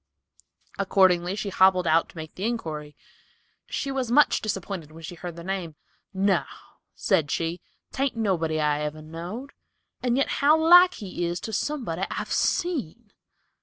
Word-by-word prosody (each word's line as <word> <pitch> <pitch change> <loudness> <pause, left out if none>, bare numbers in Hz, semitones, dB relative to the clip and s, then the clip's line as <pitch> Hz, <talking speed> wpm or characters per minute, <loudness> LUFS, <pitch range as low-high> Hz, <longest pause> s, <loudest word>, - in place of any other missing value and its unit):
Accordingly 185 -2 +3
she 210 -1 -3
hobbled 185 -1 +4
out 165 +1 +3
to - - -16
make 160 -1 -7
the 190 - -7
inquiry. 155 -11 -4 0.7
She 275 - -3
was 260 -3 -2
much 290 +5 +4
disappointed 195 -6 -4
when 165 +1 -12
she 160 - -7
heard 175 0 -7
the 170 - -9
name. 180 -4 -4 0.4
"No," 195 -2 +2 0.5
said 145 -3 +1
she, 165 +3 -2 0.3
"'tain't 270 -3 -1
nobody 165 -8 0
I 150 -1 +1
ever 150 +1 -4
knowed, 175 - -7 0.5
and 250 -1 +1
yet 275 - +2
how 300 +3 +6
like 355 +3 +7
he 185 -4 -4
is 175 +1 -3
to 220 - -6
somebody 220 - -2
I've - - -4
seen." 240 - -1
190 Hz, 155 wpm, -25 LUFS, 165-235 Hz, 0.7 s, like